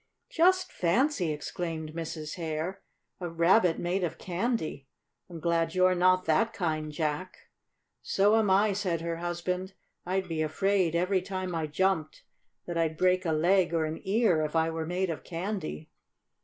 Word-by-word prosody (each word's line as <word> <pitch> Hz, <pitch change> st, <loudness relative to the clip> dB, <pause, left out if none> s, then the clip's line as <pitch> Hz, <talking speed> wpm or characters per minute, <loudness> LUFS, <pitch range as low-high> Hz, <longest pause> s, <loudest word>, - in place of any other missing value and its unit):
"Just 370 Hz, +3 st, +3 dB
fancy!" 185 Hz, -, +1 dB
exclaimed 160 Hz, +1 st, -4 dB
Mrs. 160 Hz, -2 st, -5 dB
Hare. 165 Hz, +3 st, -4 dB, 0.4 s
"A 175 Hz, -2 st, -4 dB
Rabbit 170 Hz, +2 st, +3 dB
made 180 Hz, +2 st, -1 dB
of 170 Hz, -, -2 dB
candy! 180 Hz, -, -2 dB, 0.4 s
I'm 170 Hz, -2 st, -8 dB
glad 165 Hz, 0 st, 0 dB
you're 185 Hz, 0 st, +4 dB
not 185 Hz, +1 st, +3 dB
that 225 Hz, +9 st, +2 dB
kind, 155 Hz, -6 st, -2 dB
Jack." 155 Hz, +4 st, -4 dB, 0.5 s
"So 205 Hz, +2 st, +3 dB
am 220 Hz, -3 st, +3 dB
I," 200 Hz, +2 st, +4 dB
said 185 Hz, -4 st, -1 dB
her 170 Hz, 0 st, -3 dB
husband. 180 Hz, +2 st, -3 dB, 0.3 s
"I'd 190 Hz, +1 st, -1 dB
be 160 Hz, -2 st, -2 dB
afraid, 180 Hz, +2 st, +1 dB
every 185 Hz, +2 st, +2 dB
time 185 Hz, -1 st, -4 dB
I 160 Hz, -2 st, -1 dB
jumped, 160 Hz, 0 st, 0 dB, 0.4 s
that 170 Hz, -1 st, -3 dB
I'd 160 Hz, -1 st, 0 dB
break 185 Hz, 0 st, +2 dB
a -, -, +1 dB
leg 170 Hz, +2 st, +3 dB
or 160 Hz, -1 st, +1 dB
an 155 Hz, +1 st, -5 dB
ear, 195 Hz, -5 st, +2 dB
if 150 Hz, +1 st, -3 dB
I 160 Hz, 0 st, +2 dB
were 160 Hz, -1 st, -4 dB
made 180 Hz, +1 st, -1 dB
of 160 Hz, -, -6 dB
candy." 170 Hz, -, -5 dB
175 Hz, 160 wpm, -29 LUFS, 160-190 Hz, 0.5 s, you're